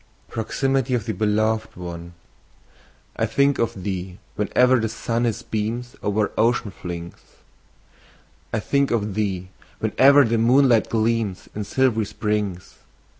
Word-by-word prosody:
PROXIMITY 135 +3 0
OF 115 - -2
THE 110 - -2
BELOVED 110 +2 0
ONE. 85 -1 -8 1.0
I 115 - +1
THINK 140 +5 +2
of 105 -5 -1
thee, 95 -2 -4 0.2
whene'er 125 +5 +3
the 110 - -1
sun 115 +2 -1
his 115 -3 -2
beams 115 +3 -3
O'er 105 +1 0
ocean 115 -2 +2
flings; 85 -2 -7 1.4
I 115 - 0
think 140 +4 +1
of 105 -3 -1
thee, 95 -3 -2 0.3
whene'er 140 +2 +5
the 115 0 +1
moonlight 120 -1 +4
gleams 110 -4 -1
In 105 - -4
silv'ry 110 0 +1
springs. 105 -4 -3
110 Hz, 125 wpm, -23 LUFS, 100-120 Hz, 1.4 s, whene'er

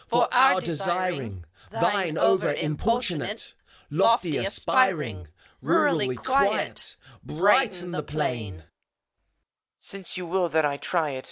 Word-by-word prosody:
For 240 +1 +2
our 250 -7 +5
desiring, 170 - -2 0.2
Thine 175 -3 0
over 190 - +2
importunate 175 - -2 0.4
Lofty 180 -1 +2
aspiring! 165 - 0 0.3
Rurally 130 -1 +1
quiet, 265 - 0 0.3
Brighten 185 - +2
the 175 - -3
plain! 125 -9 -3
EUPHORION. 80 - -16 1.2
Since 195 -3 -6
you 180 - -5
will 175 0 0
that 160 -1 +2
I 140 -1 -1
try 160 -1 -1
it. 130 - -5
175 Hz, 110 wpm, -25 LUFS, 145-195 Hz, 1.2 s, our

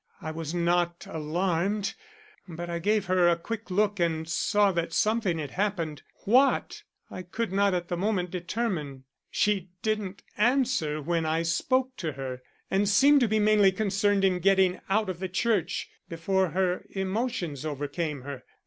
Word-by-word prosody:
I 160 - -5
was 160 -1 -5
not 175 0 0
alarmed, 175 +6 -1 0.5
but 175 0 -6
I 170 - -2
gave 205 +3 +1
her 180 -2 +4
a 170 - +4
quick 220 +6 -6
look 205 +2 +1
and 160 -2 0
saw 200 +4 +2
that 170 -2 -2
something 215 -5 +1
had 145 -4 -5
happened. 175 -7 -2 0.2
What, 260 +6 +3 0.3
I 185 - -6
could 195 +4 -4
not 200 -1 +2
at 175 -1 -2
the 175 - -2
moment 185 -2 -1
determine. 175 - -3 0.3
She 195 -3 0
didn't 210 -3 -2 0.2
answer 230 - +1
when 165 +1 0
I 160 +1 +1
spoke 255 +10 0
to 160 -4 -3
her 130 -2 -6 0.3
and 195 +1 +2
seemed 280 +8 +6
to 245 - +3
be 220 +1 +1
mainly 210 -2 +5
concerned 200 0 +1
in 185 -2 +2
getting 190 0 +3
out 215 +2 +2
of 185 -2 -4
the 190 0 -3
church 205 +1 0 0.2
before 190 +3 0
her 180 +1 0
emotions 190 - -2
overcame 145 0 -3
her. 135 -2 -7
185 Hz, 160 wpm, -27 LUFS, 165-210 Hz, 0.5 s, seemed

